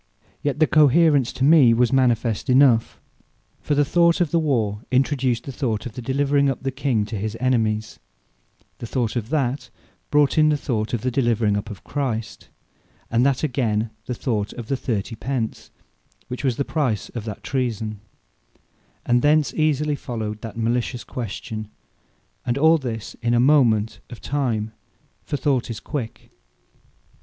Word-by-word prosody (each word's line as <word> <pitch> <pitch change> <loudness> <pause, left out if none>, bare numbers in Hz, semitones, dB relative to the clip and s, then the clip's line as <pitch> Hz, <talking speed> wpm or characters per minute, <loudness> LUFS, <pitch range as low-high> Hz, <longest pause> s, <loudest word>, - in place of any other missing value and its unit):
Yet 145 -1 -1
the 155 - +6
Cohaerence 150 -3 +4
to 130 - -3
me 140 -6 +6
was 125 +2 +2
manifest 120 -4 +1
enough. 125 -3 +4 0.6
For 145 - -1
the 145 0 +3
Thought 170 +3 +3
of 175 -4 +1
the 170 - +3
warre, 110 -9 0
introduced 130 -2 +1
the 135 - -6
Thought 120 -5 -2
of 120 - -6
the 125 - -7
delivering 140 +2 +1
up 135 -1 -4
the 135 - -1
King 130 -5 0
to 110 - -6
his 110 +2 -4
Enemies; 110 -4 0 0.8
The 120 - -6
Thought 120 -2 -1
of 115 -2 -3
that, 135 -3 -1 0.4
brought 145 +1 +3
in 155 0 +5
the 150 - +2
Thought 115 -5 -2
of 115 - -4
the 130 - -1
delivering 115 -5 +1
up 105 - -3
of 105 - -9
Christ; 120 -6 -4 0.6
and 115 +1 +3
that 140 0 0
again 115 -6 0 0.2
the 125 - -2
Thought 110 -5 -2
of 120 -3 -8
the 135 - +1
30 115 -4 -3
pence, 120 -2 -3 0.6
which 125 +3 -5
was 130 -4 +1
the 140 - -1
price 130 -10 -1
of 115 - -6
that 105 -3 -7
treason: 115 -5 -2 1.1
and 120 0 +3
thence 150 +1 +3
easily 150 -1 +1
followed 110 -5 -5
that 115 0 -8
malicious 120 +2 -1
question; 110 -2 -6 0.7
and 120 +1 -1
all 160 +3 +5
this 115 -5 -5
in 120 0 +1
a - - +3
moment 120 -6 +3
of 120 - -9
time; 115 -7 -2 0.5
for 145 - -3
Thought 135 -3 0
is 115 - -5
quick. 130 -7 -6
125 Hz, 165 wpm, -22 LUFS, 115-140 Hz, 1.1 s, the